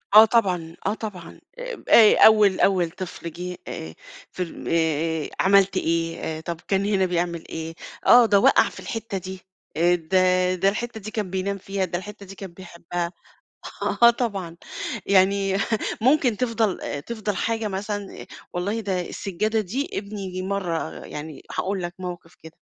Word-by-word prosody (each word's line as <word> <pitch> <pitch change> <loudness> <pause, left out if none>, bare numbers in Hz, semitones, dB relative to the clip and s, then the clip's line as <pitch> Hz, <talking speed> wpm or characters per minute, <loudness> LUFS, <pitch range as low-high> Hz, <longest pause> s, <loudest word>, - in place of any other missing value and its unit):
آه، 215 +1 +11
طبعًا، 180 -8 +1
آه 200 - +2
طبعًا، 195 -6 -8 0.2
آب - - -6
آآ 220 -2 +8
أول 210 -3 +6
أول 185 -4 +3
طفل 170 -1 -7
جِه 180 +2 -6
آآ، 80 0 -6 0.4
في 185 - -3
ال 170 - -9
آآ 160 -1 0
عملت 195 0 +4
إيه، 165 -2 -1
طب 170 0 -5
كان 195 0 +1
هنا 200 -2 +2
بيعمل 175 -2 -1
إيه، 160 0 -5 0.3
آه، 245 -1 +8
ده 205 -3 +4
وقَع - - +5
في - - -12
الحتّة 225 -3 -4
دي، 190 0 -7 0.4
آآ 175 +2 +4
ده 185 +2 +2
ده 190 +2 +3
الحتّة 225 +2 -4
دي 215 +1 -8
كان 210 -4 -3
بينام 190 +2 -2
فيها، 195 0 -2
ده 175 -1 -3
الحتّة 205 +2 -9
دي 195 +1 -11
كان 190 -3 -9
بيحبها، 170 -1 -5 0.9
آه 235 - +10
طبعًا، 200 -8 -3 0.5
يعني 195 0 +3 0.4
ممكن 255 -1 +3
تفضَل 220 - -1
تفضَل 215 -2 -4
حاجة 225 0 -1
مثلًا، 205 +1 -5 0.3
والله 200 +6 -2
ده 190 -4 -1
السجادة 215 +4 -1
دي 235 +9 -3
ابني 195 -2 -5
مرة 185 -4 -3
يعني 150 0 -8 0.2
هاقول 195 -1 -1
لَك 175 0 -5
موقف 175 -2 -7
كده، 160 0 -14
190 Hz, 155 wpm, -24 LUFS, 175-210 Hz, 0.9 s, آه